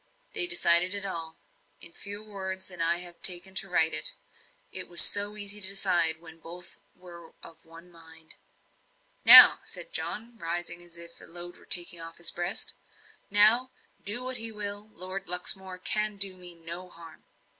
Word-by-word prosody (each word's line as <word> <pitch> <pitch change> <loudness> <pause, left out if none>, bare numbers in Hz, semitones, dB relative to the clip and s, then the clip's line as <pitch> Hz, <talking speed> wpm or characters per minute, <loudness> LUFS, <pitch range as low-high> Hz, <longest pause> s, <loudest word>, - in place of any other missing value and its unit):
They 355 - -2
decided 180 - +4
it 200 0 -5
all 165 -4 -7 0.4
in 170 - -13
fewer 205 +1 -9
words 190 -2 -9
than 180 -2 -8
I 170 +1 -2
have 175 -1 -12
taken 180 +1 +3
to 195 0 -4
write 160 -2 -1
it - - -1 0.6
it - - -4
was 175 -1 +7
so 205 +1 +3
easy 205 0 -3
to 190 - +3
decide 180 -4 0
when 160 -1 -17
both 175 +2 -13 0.2
were 170 -2 -17
of 165 0 -15
one 165 +2 -19
mind. 160 -1 -18 0.9
"Now," - - +10
said - - -8
John, 230 - -8
rising, 170 +1 -6
as 170 -1 -16
if 170 0 -11
a - - -15
load 175 +1 -13
were - - -22
taken 175 -1 -1
off 165 0 -12
his 170 - -2
breast 175 +7 -5 0.6
"now, 215 +5 +4 0.3
do 210 +5 -4
what 255 0 -5
he 225 -1 +1
will 205 0 -6
Lord 185 -1 -11
Luxmore 185 +1 -2
cannot 210 +3 +1
do 195 -1 -2
me 180 -1 -9
any 170 +2 -11
harm." 165 -2 -18
180 Hz, 175 wpm, -24 LUFS, 170-205 Hz, 0.9 s, Now